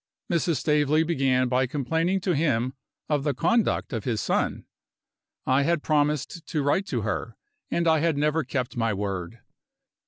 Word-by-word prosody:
Mrs. 170 -1 +1
Staveley 150 0 +2
began 135 -6 +1
by 130 +1 +1
complaining 160 +8 0
to 180 -1 0
him 130 -5 +1 0.3
of 145 -2 0
the 145 -2 0
conduct 220 - +1
of 115 -3 -2
his 115 -2 -1
son. - - -1 0.8
I 130 +2 +3
had 160 +1 +1
promised 150 +2 0
to 150 -4 -1
write 185 +8 +1
to 120 - -1
her, 110 +2 -3 0.3
and 170 0 0
I 160 -1 +4
had 160 -1 +1
never 150 +2 +1
kept 130 -1 -3
my 115 -3 0
word. 100 +1 -4
145 Hz, 160 wpm, -26 LUFS, 125-160 Hz, 0.8 s, I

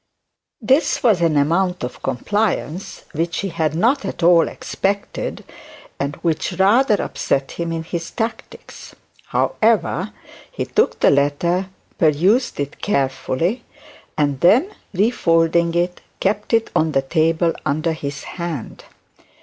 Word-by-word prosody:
This 265 +6 +2
was 215 -8 +4
an 165 -3 +2
amount 175 +4 +1
of 125 0 -6
compliance 195 - -2
which 165 +2 -2
he 195 - -3
had 160 -3 -1
not 245 - +2
at - - -5
all 170 -1 +6
expected, 200 +1 -3 0.6
and 140 +1 -2
which 165 +1 0
rather 210 +6 +4
upset 135 0 -1
him 170 -1 -4
in 165 -1 -3
his 165 0 -5
tactics. 225 -1 -6 0.3
However, 215 -3 +1 0.4
he - - -3
took 445 - +1
the - - +6
letter, 145 +7 +1 0.3
perused 180 - +2
it 145 0 -4
carefully, 140 - -1 0.5
and 145 -3 +1
then 250 - +4 0.2
refolding 170 -5 +2
it, 175 +1 -1 0.2
kept 205 +2 -1
it 225 -1 +2
on 155 -1 +2
the 135 - +2
table 165 +3 +1
under 155 +3 0
his 140 -3 -6
hand. 170 -8 -6
170 Hz, 125 wpm, -20 LUFS, 155-200 Hz, 0.6 s, all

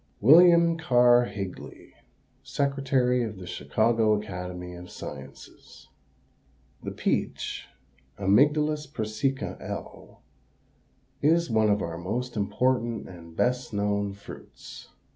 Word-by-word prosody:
WILLIAM 170 - +6
KERR 125 -4 +5
HIGLEY, 100 -4 -8 0.5
Secretary 135 -3 0
of 110 -3 -5
The 90 - -9
Chicago 110 +3 +1
Academy 90 -3 -7
of 90 0 -10
Sciences. - - -11 0.9
The - - -5
peach - - -2 0.5
(Amygdalus 150 +8 +2
persica, 110 +2 -2
L.), - - -9 1.0
is 165 +1 +2
one 110 -1 +3
of 105 0 +1
our 85 0 -5
most 120 +8 -4
important 115 +2 0
and 85 -2 -12
best 125 +2 0
known 100 0 -1
fruits. 100 - -12
115 Hz, 100 wpm, -26 LUFS, 100-135 Hz, 1.0 s, WILLIAM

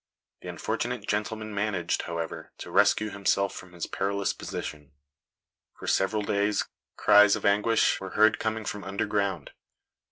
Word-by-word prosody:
The - - -9
unfortunate 120 -3 -3
gentleman 110 +1 -2
managed, 100 -3 -1
however, 85 -1 -5
to - - -9
rescue 105 -1 +3
himself 100 0 +1
from 90 -1 -11
his 85 -2 -4
perilous 100 0 -1
position. 75 -2 -7 0.8
For - - -10
several 105 +2 +1
days 100 0 +1 0.3
cries 105 0 +6
of - - -5
anguish 105 +3 +3
were 95 - -5
heard 110 0 +5
coming 110 0 -2
from 105 0 -4
underground." 100 0 -2
100 Hz, 135 wpm, -27 LUFS, 95-105 Hz, 0.8 s, cries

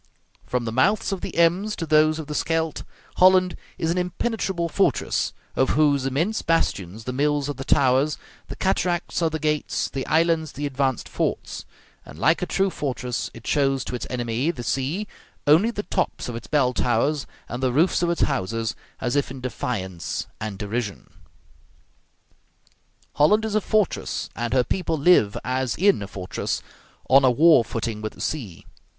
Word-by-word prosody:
From 125 -1 -1
the 115 - -2
mouths 190 - +2
of 195 - -3
the - - -6
Ems 180 +6 +3
to 165 - -4
those 155 0 +4
of 160 - -5
the 150 - -6
Scheldt, 160 0 -1 0.4
Holland 185 -1 +5 0.2
is 165 - 0
an 180 - 0
impenetrable 180 -1 -1
fortress, 165 - +1 0.2
of 130 - +2
whose 145 -3 +3
immense 165 +12 0
bastions 110 - -1
the 125 - -4
mills 145 +1 +1
are 145 - -2
the 135 0 -7
towers, 135 +2 +3 0.3
the - - -7
cataracts 180 -2 0
are 165 - +3
the 160 - -3
gates, 150 -1 -1
the 135 -1 -3
islands 160 -2 +2
the 145 - -4
advanced 135 -3 -1
forts; - - -3 0.4
and 70 - -12
like 160 - +3
a 180 - -1
true 195 +2 +1
fortress, 125 -5 -3
it 115 - -12
shows 135 -2 +1
to - - -5
its 125 - -4
enemy, 120 +3 -1
the 125 -8 -4
sea, 140 - -1 0.4
only 160 +10 +5
the 205 -3 -4
tops 185 - -2
of 120 - -5
its 115 - -7
bell 135 -4 +2
towers 125 +5 +1 0.2
and 120 +2 -5
the 130 -1 +2
roofs 160 +9 +2
of 175 - +1
its 170 - -1
houses, 115 -4 0 0.3
as 125 +1 -1
if 145 - +1
in 135 0 -7
defiance 105 -8 -4
and 105 -2 -5
derision. 105 0 -4 2.0
Holland 210 +9 +4
is 220 - -3
a 215 - +2
fortress, 215 -3 -1
and 120 -1 -3
her 125 -1 +3
people 170 +2 -1
live 140 - +4
as 130 0 -1
in 195 - +3
a 100 - -5
fortress, 95 -2 -4 0.4
on 135 +1 +6
a 130 - +6
war 150 +1 +6
footing 115 -1 -4
with 110 0 -4
the - - -12
sea. 115 - -4
145 Hz, 175 wpm, -24 LUFS, 125-170 Hz, 2.0 s, on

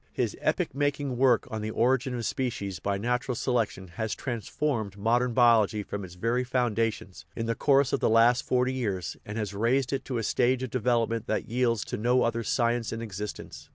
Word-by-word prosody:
His - - -1
epoch - - 0
making 145 -1 -1
work 125 -2 +3
on 110 -1 -3
The 110 - -3
Origin 125 +3 +1
of 120 -2 -3
Spe 130 -2 -1
cies 100 -7 -6
by 100 0 -1
Natural 125 +4 -1
Selection 115 -7 -1
has 110 +6 -3
transformed 115 -2 -3
modern 120 +3 +1
biol 115 -3 +6
ogy 105 0 -5
from 100 -1 -5
its 90 -1 -10
very 115 +7 0
foundations, 115 -8 -1
in 115 - -3
the 115 - 0
course 140 +1 +3
of 140 - +2
the - - +2
last 115 +2 +5
forty 125 +1 +1
years, 100 - -2
and 105 +2 -5
has 105 -2 -3
raised 125 +6 +1
it 135 -1 -1
to 125 - -3
a 115 - -2
stage 125 +3 +1
of 130 - -4
development 115 -2 0
that 110 - -1
yields 120 -3 +1
to - - -4
no 125 +3 +2
other 115 0 0
science 120 0 0
in 115 0 -4
existence. 105 -1 -7
115 Hz, 205 wpm, -28 LUFS, 110-125 Hz, -, biol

